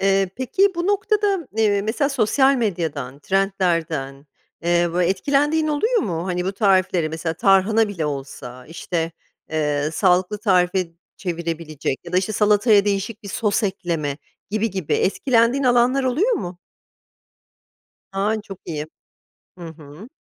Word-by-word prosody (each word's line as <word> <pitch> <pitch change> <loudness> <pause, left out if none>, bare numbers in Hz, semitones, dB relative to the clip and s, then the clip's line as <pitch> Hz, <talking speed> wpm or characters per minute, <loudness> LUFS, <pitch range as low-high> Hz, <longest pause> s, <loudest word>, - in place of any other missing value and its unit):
Eee, 195 -1 +2
peki 375 +10 +1
bu 345 +1 -2
noktada, 410 0 +1
m, 330 - -9
eee, 205 -2 +3
mesela 245 +7 0
sosyal 265 +2 +3
medyadan, 160 - -2
trendlerden, 165 -7 -1 0.4
eee, 175 0 +2
bö 180 - +1
etkilendiğin 285 - +1
oluyor 445 +11 +1
mu? 170 -2 -3
Hani, 180 -1 -2
bu 190 - -1
tariflere 185 -5 +2
mesela, 160 +1 -3
tarhana 200 +5 +3
bile 170 -7 -3
olsa, 135 -3 -7
işte, 165 0 -3 0.4
eee, 150 -1 0
sağlıklı 185 +2 +2
tarife 185 -3 +2 0.3
çevirebilecek 165 -5 -4
ya 170 - -9
da, - - +2
işte, 195 +3 -2
salataya 210 0 +4
değişik 205 +2 -2
bir 200 - -8
sos 210 +1 0
ekleme 165 -7 -2 0.3
gibi 215 +1 0
gibi, 190 -5 -4
etkilendiğin 240 +5 +2
alanlar 250 +2 +3
oluyor 335 - +1
mu? 175 - -4 1.6
Ha, 205 +3 0
çok 195 -3 -10
iyi! 150 -2 -4 0.7
Hı 170 - -8
hı. 160 - -12
195 Hz, 135 wpm, -21 LUFS, 165-230 Hz, 1.6 s, salataya